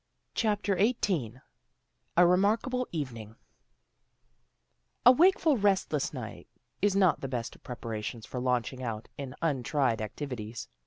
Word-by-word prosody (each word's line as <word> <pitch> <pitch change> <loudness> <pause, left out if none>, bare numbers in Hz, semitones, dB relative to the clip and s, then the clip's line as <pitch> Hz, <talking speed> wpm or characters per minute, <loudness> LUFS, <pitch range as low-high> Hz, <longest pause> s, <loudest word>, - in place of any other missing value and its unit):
CHAPTER 210 -3 +1
XVIII 175 - 0 0.8
A 175 - +8
REMARKABLE 220 +8 +2
EVENING 115 -9 -5 1.7
A 250 - +11
WAKEFUL 325 -1 +4
restless 200 -2 +1
night - - -7 0.3
is 205 -1 +3
not 185 -4 +3
the 135 - -3
best 120 -3 -4
of - - -20
preparations 115 -2 -5
for 125 - -5
launching 125 0 -1
out 115 -3 -4
in 135 -2 -6
untried 135 -5 +1
activities. 120 0 -5
140 Hz, 115 wpm, -29 LUFS, -, 1.7 s, A